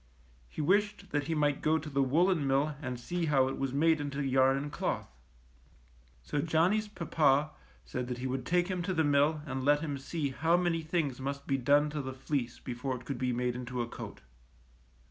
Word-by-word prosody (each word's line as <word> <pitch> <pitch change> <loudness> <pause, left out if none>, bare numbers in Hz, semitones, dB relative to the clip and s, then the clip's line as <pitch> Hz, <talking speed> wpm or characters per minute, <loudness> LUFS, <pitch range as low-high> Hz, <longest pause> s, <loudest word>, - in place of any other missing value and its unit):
He - - -5
wished 200 +4 +1
that 145 -1 0
he 165 +2 -1
might 145 -2 +1
go 155 +1 +3
to 160 0 -6
the 140 -2 0
woolen 160 +3 +2
mill 140 +3 +1
and 130 -4 -4
see 170 +6 -2
how 135 -3 +3
it 135 - -5
was 135 -1 -1
made 155 +3 +3
into 145 0 -3
yarn 135 0 +4
and 145 +1 -4
cloth. - - -2 1.2
So 145 - -1
Johnny^s 175 +7 +2
papa 150 -3 +2 0.3
said 120 - -4
that 125 -1 -3
he 125 - -5
would 130 0 -2
take 175 +4 +1
him 185 -2 -2
to 185 +2 -2
the 160 - +3
mill 145 +1 +2
and 130 -3 -3
let 145 +2 +4
him 145 -4 -3
see 140 +1 -3
how 165 +6 +2
many 175 -2 +1
things 155 -5 -1
must 140 +1 -4
be 135 - +1
done 145 +4 +3
to 150 -1 -2
the 130 -1 -5
fleece 130 -3 -2
before 125 +1 -4
it 125 0 -10
could 135 -2 -4
be 125 -1 0
made 125 0 -1
into 125 -1 -3
a - - -5
coat. - - -8
145 Hz, 210 wpm, -31 LUFS, 130-160 Hz, 1.2 s, yarn